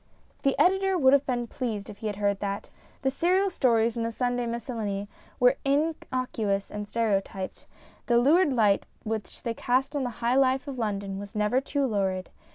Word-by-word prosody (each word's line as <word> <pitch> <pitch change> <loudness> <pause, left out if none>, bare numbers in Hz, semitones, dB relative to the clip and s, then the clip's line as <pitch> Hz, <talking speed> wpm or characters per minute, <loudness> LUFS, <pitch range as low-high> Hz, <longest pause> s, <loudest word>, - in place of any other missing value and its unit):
The 275 -2 +1
Editor 385 +1 +3
would 265 -4 +5
have 280 0 +3
been 245 -2 0
pleased 225 -4 -4
if 200 - -10
he 220 - -3
had 210 - -2
heard 200 0 0
that. 200 -1 -4 0.3
The 265 - +2
serial 370 +7 +2
stories 230 -7 +2
in 235 - -2
The 230 0 -1
Sunday 245 0 -1
Miscellany 220 -4 -3 0.3
were 250 +2 +5
innocuous 255 -8 -1
and 210 0 -5
stereotyped. 195 -4 -2 0.4
The 240 -2 +4
lurid 295 +6 +4
light 215 -6 +3 0.2
which 220 -1 -5
they 235 - -1
cast 260 +5 0
on 285 - 0
the 250 - -1
high 235 +1 +1
life 265 +1 +2
of 270 -3 -5
London 200 -3 -2
was 205 +1 -9
never 210 +5 +2
too 280 0 -1
lurid. 190 -5 -1
235 Hz, 180 wpm, -27 LUFS, 210-270 Hz, 0.4 s, would